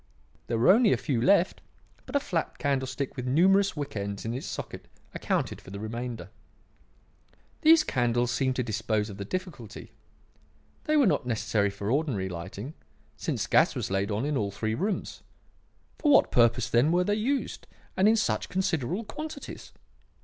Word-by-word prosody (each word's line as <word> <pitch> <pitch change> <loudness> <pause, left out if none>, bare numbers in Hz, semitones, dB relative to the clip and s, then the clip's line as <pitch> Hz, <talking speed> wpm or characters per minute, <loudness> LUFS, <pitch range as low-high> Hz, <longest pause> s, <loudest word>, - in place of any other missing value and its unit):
There 115 - -1
were 120 +10 +6
only 220 0 +5
a - - +1
few 130 -6 -1
left, 185 +6 +3 0.5
but - - -7
a - - +5
flat 175 -11 -3
candlestick 135 -1 -2
with 125 -2 -4
numerous 190 +6 +3
wick 145 -4 -4
ends 100 0 -4
in 115 - -2
its 130 - -5
socket - - -7 0.3
accounted - - -2
for - - -13
the 100 +1 -7
remainder. 115 +2 -5 1.3
"These 320 0 +7
candles 120 - +1
seemed 130 0 0
to 125 - 0
dispose 110 -1 -1
of 100 - -9
the 100 - -5
difficulty. 150 - -6 0.9
They 305 0 +2
were 285 - +5
not 185 - +1
necessary 110 -3 +1
for 100 +2 -4
ordinary 130 -10 0
lighting, 95 - -7 0.4
since - - -2
gas - - +3
was - - -3
laid 95 +1 0
on 105 +5 -1
in 145 -1 0
all 100 -4 -1
three 110 +2 -3
rooms. 195 - -3 0.8
For 295 - +3
what 275 - +5
purpose, 120 0 +3
then, 125 +7 +3
were 180 +1 +3
they 205 - 0
used, 255 +6 -2 0.3
and 190 +2 +4
in 220 - +5
such 220 - 0
considerable 180 - -1
quantities? 305 +5 -8
130 Hz, 170 wpm, -28 LUFS, -, 1.3 s, These